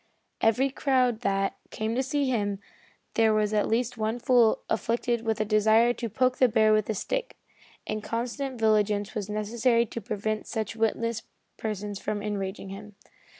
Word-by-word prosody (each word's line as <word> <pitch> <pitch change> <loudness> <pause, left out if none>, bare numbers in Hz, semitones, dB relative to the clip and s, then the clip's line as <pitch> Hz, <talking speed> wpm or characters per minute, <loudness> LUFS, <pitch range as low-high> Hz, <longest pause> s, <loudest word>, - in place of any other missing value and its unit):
In - - +4
every 260 +5 +2
crowd 255 -4 +1
that, 195 -3 0
came 220 +1 -2
to 255 - +1
see 275 +1 0
him 205 -5 0 0.6
there 220 -1 +3
was 215 0 +1
at 210 - +2
least 235 +1 -1
one 220 +2 0
fool 240 -2 +3
afflicted 235 +1 0
with 225 -1 -1
a 215 - +1
desire 220 +3 +4
to 235 -1 -4
poke 255 +3 +1
the 255 - +5
bear 215 -1 +4
with 215 0 +1
a 220 - 0
stick, - - -3 0.5
and 215 0 -3
constant 245 +3 -3
vigilance 210 -2 +2
was 210 -3 -4
necessary 230 +3 +1
to 230 +1 -6
prevent 215 +2 -3
such 220 -1 -3
witless 225 0 0 0.3
persons 205 -2 -4
from 205 -1 -3
enraging 195 -2 -4
him. 205 +1 -9
220 Hz, 170 wpm, -27 LUFS, 210-240 Hz, 0.6 s, the